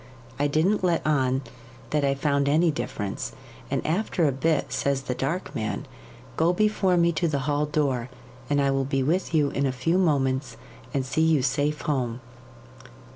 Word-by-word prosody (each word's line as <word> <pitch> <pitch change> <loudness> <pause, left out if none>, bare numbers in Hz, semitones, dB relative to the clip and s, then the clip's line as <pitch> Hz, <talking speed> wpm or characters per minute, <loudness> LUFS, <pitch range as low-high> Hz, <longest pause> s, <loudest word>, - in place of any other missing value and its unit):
I 145 - +3
didn't 170 +8 +1
let 175 -2 +1
on 135 -3 +1 0.5
that 150 -1 +1
I 135 0 +2
found 140 0 +1
any 160 +3 +4
difference, 105 -8 -4 0.4
and - - -2
after 175 0 0
a 145 - +3
bit 140 0 0
says 135 0 0
the 130 - -2
Dark 150 +9 -3
Man, 110 0 -3 0.5
"Go 165 +2 +3
before 195 -2 +2
me 170 0 +4
to 170 +1 0
the 145 -3 -1
hall 150 0 +1
door, 135 -5 0 0.4
and 145 0 +2
I 140 -1 +2
will 135 0 +1
be 135 0 0
with 170 +7 0
you 145 -2 +3
in 140 0 0
a - - 0
few 145 +8 +1
moments, 135 -7 +1 0.3
and 135 -3 -1
see 145 +4 0
you 160 -4 +3
safe 145 +3 0
home." 125 -5 -1
145 Hz, 180 wpm, -25 LUFS, 135-160 Hz, 0.5 s, any